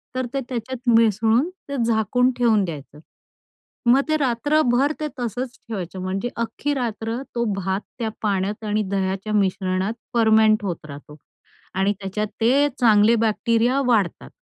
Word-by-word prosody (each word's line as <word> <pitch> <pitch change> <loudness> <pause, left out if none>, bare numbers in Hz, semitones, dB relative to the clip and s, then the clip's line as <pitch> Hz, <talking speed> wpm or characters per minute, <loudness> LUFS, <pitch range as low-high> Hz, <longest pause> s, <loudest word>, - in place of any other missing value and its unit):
तर 255 0 -1
ते 275 - -1
त्याच्यात 245 +1 -4
मिसळून, 225 - +3
ते 330 -7 -8
झाकून 235 +3 +2
ठेवून 225 -4 +3
द्यायचं. 150 -3 -8 0.9
मग 250 +3 +6
ते 310 - +3
रात्रभर 275 0 +2
ते 305 - -2
तसंच 245 +2 -4
ठेवायचं 190 -4 -5
म्हणजे 195 +5 -2
अख्खी 235 +5 -2
रात्र 230 -2 -3
तो 235 - +1
भात 195 +1 -2 0.2
त्या 225 -2 -1
पाण्यात 205 +1 -1
आणि 210 0 0
दह्याच्या 195 +2 -2
मिश्रणात 190 0 0 0.2
फर्मेंट 220 -2 +4
होत 175 -6 -4
राहतो 145 0 -11 0.6
आणि 195 +2 +2
त्याच्यात 205 +2 -3
ते 270 +6 +4
चांगले 220 -2 +5
बॅक्टेरिया 230 +4 +1
वाढतात. 210 -8 +1
220 Hz, 135 wpm, -22 LUFS, 195-245 Hz, 0.9 s, मग